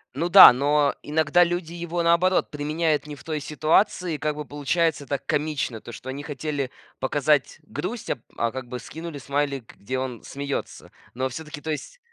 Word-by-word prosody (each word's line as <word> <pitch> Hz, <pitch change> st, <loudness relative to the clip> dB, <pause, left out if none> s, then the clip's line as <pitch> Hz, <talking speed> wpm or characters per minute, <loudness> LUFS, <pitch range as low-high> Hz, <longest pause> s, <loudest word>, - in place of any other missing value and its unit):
Ну 165 Hz, +5 st, 0 dB
да, 190 Hz, +2 st, +12 dB
но 145 Hz, +2 st, +2 dB
иногда 160 Hz, +3 st, +3 dB
люди 175 Hz, -1 st, -2 dB
его, 175 Hz, 0 st, -3 dB
наоборот, 170 Hz, +2 st, +3 dB
применяют 150 Hz, +1 st, 0 dB
не 150 Hz, -1 st, -7 dB
в -, -, -15 dB
той 155 Hz, -2 st, -3 dB
ситуации. 155 Hz, +3 st, +1 dB
Как 150 Hz, +1 st, -2 dB
бы 150 Hz, -, -5 dB
получается 145 Hz, +2 st, 0 dB
так 140 Hz, 0 st, -3 dB
комично, 145 Hz, -7 st, -1 dB
то, -, -, -10 dB
что 130 Hz, -, -9 dB
они 140 Hz, +2 st, -5 dB
хотели 145 Hz, -2 st, -3 dB, 0.3 s
показать 145 Hz, +2 st, +1 dB
грусть, 185 Hz, +11 st, -5 dB
а -, -, +1 dB
п -, -, -26 dB, 0.2 s
а 115 Hz, 0 st, 0 dB
как 130 Hz, 0 st, -6 dB
бы 125 Hz, 0 st, -5 dB
скинули 160 Hz, +4 st, -8 dB
смайлик, 140 Hz, -3 st, -2 dB
где 130 Hz, +6 st, -3 dB
он 130 Hz, -3 st, -5 dB
смеётся. 140 Hz, 0 st, -5 dB, 0.2 s
Но 130 Hz, +2 st, -1 dB
всё-таки, 150 Hz, +3 st, -8 dB
то 160 Hz, -, -6 dB
есть 325 Hz, -, -5 dB
150 Hz, 185 wpm, -25 LUFS, 140-165 Hz, 0.3 s, да